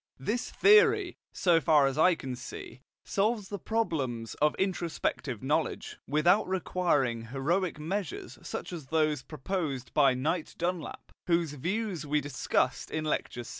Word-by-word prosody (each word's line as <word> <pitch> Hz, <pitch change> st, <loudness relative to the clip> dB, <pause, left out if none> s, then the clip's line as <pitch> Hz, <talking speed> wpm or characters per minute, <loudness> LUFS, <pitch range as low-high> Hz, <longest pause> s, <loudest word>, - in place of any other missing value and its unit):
This 215 Hz, -, -2 dB
theory, 425 Hz, +1 st, +5 dB, 0.2 s
so 170 Hz, -3 st, +3 dB
far 150 Hz, 0 st, +5 dB
as 135 Hz, -1 st, 0 dB
I 170 Hz, +4 st, +5 dB
can 130 Hz, -5 st, -5 dB
see, 130 Hz, +1 st, -9 dB, 0.2 s
solves 210 Hz, 0 st, 0 dB
the 200 Hz, -, -4 dB
problems 135 Hz, -, -2 dB
of 150 Hz, 0 st, +3 dB
introspective 170 Hz, -, -2 dB
knowledge, 150 Hz, +4 st, -1 dB
without 175 Hz, +9 st, +3 dB
requiring 165 Hz, -11 st, 0 dB
heroic 155 Hz, +8 st, -1 dB
measures 180 Hz, +2 st, -4 dB
such -, -, -6 dB
as 155 Hz, -6 st, -7 dB
those 155 Hz, -2 st, +1 dB
proposed 145 Hz, -5 st, -4 dB
by 135 Hz, -3 st, +5 dB
Knight 155 Hz, +6 st, -2 dB
Dunlap, 175 Hz, -2 st, -4 dB, 0.2 s
whose 170 Hz, -3 st, +1 dB
views 185 Hz, -, -2 dB
we 150 Hz, 0 st, +1 dB
discussed 130 Hz, -2 st, -1 dB
in 155 Hz, 0 st, -3 dB
Lecture 125 Hz, -5 st, -2 dB
VI. -, -, -10 dB
155 Hz, 140 wpm, -29 LUFS, 135-185 Hz, 0.2 s, theory